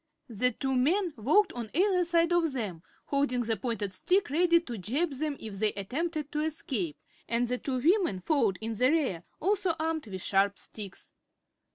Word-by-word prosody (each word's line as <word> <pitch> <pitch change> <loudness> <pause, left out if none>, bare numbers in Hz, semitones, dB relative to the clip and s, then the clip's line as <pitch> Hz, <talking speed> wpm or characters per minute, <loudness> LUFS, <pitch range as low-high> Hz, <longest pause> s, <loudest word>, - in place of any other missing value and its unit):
The 245 +3 +2
two 265 +3 -2
men 335 +7 +2
walked 305 - +3
on 235 -3 -5
either 370 +1 +3
side 335 0 +2
of 330 -4 +2
them, 205 -10 -4 0.2
holding 280 -3 +1
the 225 -1 0
pointed 210 -2 -3
sticks 370 - +1
ready 340 +2 +4
to 245 -10 -7
jab 275 - 0
them 290 +1 -2
if 205 -3 -7
they 215 0 +1
attempted 300 - -3
to 300 - -2
escape, 250 - -2 0.3
and 235 +1 +1
the 250 +1 -1
two 265 -2 -2
women 335 - +2
followed 225 - +1
in 225 +1 -3
the 250 +4 +3
rear, 270 - +1 0.2
also 380 -2 +1
armed 315 -4 -1
with 190 -3 -6
sharp 200 +1 +2
sticks. 205 -3 -8
265 Hz, 180 wpm, -29 LUFS, 220-330 Hz, 0.3 s, ready